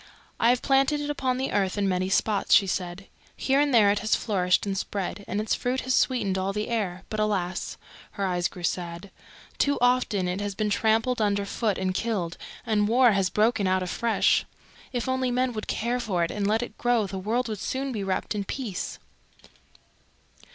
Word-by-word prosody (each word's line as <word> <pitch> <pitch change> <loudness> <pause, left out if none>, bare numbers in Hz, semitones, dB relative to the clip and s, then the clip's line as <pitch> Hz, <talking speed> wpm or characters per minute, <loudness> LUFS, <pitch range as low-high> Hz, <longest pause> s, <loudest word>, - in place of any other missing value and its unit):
"I 230 - +4
have 245 0 +2
planted 275 +2 +3
it 295 0 -2
upon 260 -3 -1
the 265 +1 -2
earth 195 -1 0
in 200 -1 +1
many 185 0 0
spots," 205 +1 +3
she 200 - +5
said. 185 0 -3 0.3
"Here 270 +1 +2
and 290 0 +2
there 215 -5 +6
it 205 - 0
has 215 +2 +2
flourished 185 -5 +1
and 195 -1 -2
spread, 195 0 -3
and 205 - -2
its 215 - 0
fruit 255 +1 -1
has 260 - -1
sweetened 200 -9 +1
all 190 +1 -1
the 210 +1 -3
air. 195 -6 -2
But, 215 - -2
alas!" 195 -4 -1 0.4
her 200 - -2
eyes 180 -2 0
grew 180 - -11
sad, 175 +2 -3 0.5
"too 285 0 +2
often 245 -6 +2
it 180 +3 -2
has 205 -1 -3
been 210 0 -1
trampled 225 +3 +2
under 205 -1 +1
foot 210 0 -1
and 185 -1 -1
killed, 190 -5 -2 0.3
and 210 -3 +2
war 245 +2 +5
has 195 -2 +1
broken 215 -1 +2
out 185 0 +2
afresh. 225 +5 +2 0.5
If 245 -1 -2
only 260 0 0
men 250 0 0
would 215 -1 -5
care 240 +3 -1
for 195 -8 0
it 165 - -1
and 205 -1 -1
let 220 +3 +2
it 230 - -9
grow 240 -3 +2
the 195 0 -5
world 235 +6 -1
would 215 -3 -4
soon 270 +1 -2
be 210 -5 -3
wrapped 195 +2 -2
in 205 -1 -2
peace." 210 -3 -4
210 Hz, 200 wpm, -26 LUFS, 190-245 Hz, 0.5 s, there